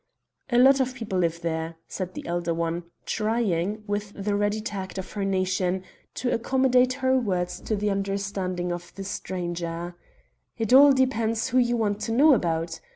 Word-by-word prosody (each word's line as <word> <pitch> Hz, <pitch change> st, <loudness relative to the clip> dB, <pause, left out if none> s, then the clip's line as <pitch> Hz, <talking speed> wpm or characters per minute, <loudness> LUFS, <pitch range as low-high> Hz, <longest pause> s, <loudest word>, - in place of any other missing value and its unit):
"A 240 Hz, -, +2 dB
lot 270 Hz, +2 st, +6 dB
of 260 Hz, 0 st, 0 dB
people 220 Hz, -7 st, -3 dB
live 170 Hz, -1 st, 0 dB
there," 165 Hz, -1 st, -3 dB
said 185 Hz, -2 st, -5 dB
the -, -, -7 dB
elder 170 Hz, -1 st, -1 dB
one, 170 Hz, +1 st, -2 dB, 0.2 s
trying, 215 Hz, -3 st, -1 dB
with 205 Hz, 0 st, -3 dB
the 205 Hz, +1 st, -2 dB
ready 205 Hz, +1 st, +1 dB
tact 195 Hz, -4 st, -5 dB
of 190 Hz, -, -6 dB
her 205 Hz, -, -3 dB
nation, 185 Hz, -1 st, 0 dB, 0.3 s
to 250 Hz, -, -1 dB
accommodate 255 Hz, +1 st, +3 dB
her 260 Hz, 0 st, +4 dB
words 180 Hz, -6 st, -2 dB
to 215 Hz, -, -1 dB
the 205 Hz, 0 st, 0 dB
understanding 195 Hz, -2 st, -2 dB
of 175 Hz, 0 st, -6 dB
the 195 Hz, -, -6 dB
stranger. 175 Hz, -2 st, -4 dB, 0.6 s
"It 225 Hz, +1 st, 0 dB
all 280 Hz, +2 st, +9 dB
depends 230 Hz, -4 st, +1 dB
who 255 Hz, -, +3 dB
you 240 Hz, -1 st, +2 dB
want 205 Hz, -2 st, 0 dB
to 225 Hz, -, -2 dB
know 290 Hz, +5 st, +6 dB
about. 165 Hz, -6 st, -1 dB
200 Hz, 170 wpm, -26 LUFS, 175-230 Hz, 0.6 s, all